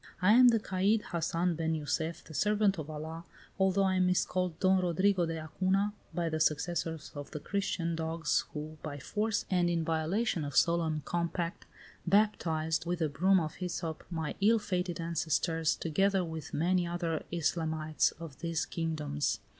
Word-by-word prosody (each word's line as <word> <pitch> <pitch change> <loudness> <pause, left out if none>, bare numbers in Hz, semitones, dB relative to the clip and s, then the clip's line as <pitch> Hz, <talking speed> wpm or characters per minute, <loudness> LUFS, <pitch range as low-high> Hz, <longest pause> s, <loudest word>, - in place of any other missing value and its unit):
"I 195 +3 +5
am 250 +2 +8
the 230 -2 +5
caid 205 +2 +1
Hassan 170 +1 0
ben 160 0 -1
Jussef, 160 +2 -2
the 160 - -12
servant 210 +1 +2
of 155 0 -6
Allah, 160 +2 -6 0.4
although 190 +1 +3
I 190 -1 +2
am 185 0 +3
miscalled 180 -2 0
Don 190 -1 +4
Rodrigo 180 +1 +2
de 165 0 -3
Acuna 190 +6 0 0.2
by 170 -2 -1
the 160 -1 -1
successors 160 0 -1
of 145 -1 -7
the 150 - -6
Christian 170 -2 -1
dogs 165 0 0
who, 155 +1 -7
by 145 -2 -5
force 210 +9 -1
and 175 -2 +3
in 165 -2 0
violation 165 +4 0
of 145 -2 -3
solemn 165 -3 +2
compact, 170 0 -2 0.4
baptized, 165 -5 +1
with 175 0 -1
a 160 -2 +1
broom 185 +7 +3
of 155 -2 -4
hyssop, 170 -3 -4
my 160 -3 -3
ill 225 +3 +5
fated 180 -5 -2
ancestors, 165 -1 0
together 195 +3 +1
with 160 -2 -6
many 175 +2 +1
other 170 -2 -2
Islamites 160 -2 0
of 160 -5 -9
these 165 -1 -1
kingdoms. 150 -7 -2
170 Hz, 160 wpm, -31 LUFS, 160-185 Hz, 0.4 s, am